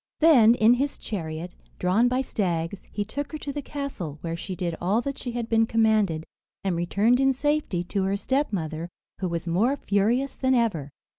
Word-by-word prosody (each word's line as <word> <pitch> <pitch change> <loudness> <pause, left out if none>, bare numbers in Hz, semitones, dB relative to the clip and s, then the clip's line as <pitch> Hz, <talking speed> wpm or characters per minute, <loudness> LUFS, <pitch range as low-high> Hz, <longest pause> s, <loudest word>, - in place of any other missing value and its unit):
Then, 250 -8 +7
in 225 0 +5
his 275 +3 -1
chariot, 165 -3 -5 0.2
drawn 190 +7 +3
by 255 +1 +1
stags, 180 -6 -2
he 205 - -2
took 285 +8 -5
her - - -2
to 285 -2 -5
the 290 - -3
castle, 265 - -5
where 165 -1 -3
she 185 +2 -5
did 175 -2 -2
all 195 +6 +2
that 275 +1 -4
she 245 - -5
had 235 -1 -3
been 225 -1 +3
commanded, 215 -8 +2 0.4
and 190 -3 0
returned 200 +8 +2
in 270 0 +4
safety, 290 - 0
to 190 +2 -1
her 195 +1 0
stepmother, 175 - -1 0.3
who 185 - -1
was 170 +1 -3
more 210 +11 +2
furious 235 +6 +1
than 260 -1 +2
ever. 195 - 0
215 Hz, 190 wpm, -26 LUFS, 175-260 Hz, 0.4 s, Then